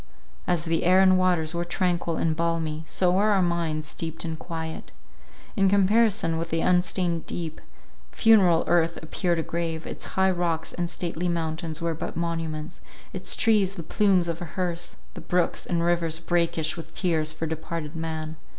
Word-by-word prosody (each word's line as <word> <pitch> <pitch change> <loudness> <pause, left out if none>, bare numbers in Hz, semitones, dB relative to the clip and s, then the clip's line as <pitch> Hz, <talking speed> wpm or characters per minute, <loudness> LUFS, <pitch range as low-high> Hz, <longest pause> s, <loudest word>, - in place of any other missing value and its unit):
As 175 -2 +1
the 165 0 0
air 185 +2 +5
and 190 -1 +6
waters 175 -3 +1
were 170 0 -1
tranquil 175 -1 -1
and 160 -1 +1
balmy, 165 -2 -1
so 180 -1 +2
were 200 +4 +3
our 200 -2 +3
minds 165 -3 -1
steeped 165 +1 -5
in 160 -1 -3
quiet. 160 - -6 0.6
In 195 -1 +4
comparison 200 -3 +3
with 165 0 -4
the 165 0 0
unstained 175 -1 +1
deep, 160 -2 -5 0.5
funereal 195 -7 +5
earth 170 -1 +2
appeared 170 +2 -1
a 165 - 0
grave, 165 -1 -3
its - - -7
high 190 0 +4
rocks 170 -3 -1
and 175 -1 -2
stately 175 0 -3
mountains 165 -1 -2
were 165 -1 0
but 160 - -5
monuments, 165 -1 -3 0.3
its 185 - 0
trees 205 -4 +3
the 170 - -6
plumes 185 0 +2
of 170 0 -3
a - - -3
herse, 175 -2 -2 0.2
the - - -8
brooks 180 -1 0
and 170 -1 0
rivers 170 -2 +1
brackish 165 -2 0
with 160 -1 -10
tears 160 -4 0
for 160 +1 -4
departed 160 0 -5
man. 160 -1 -4
170 Hz, 170 wpm, -26 LUFS, 160-180 Hz, 0.6 s, and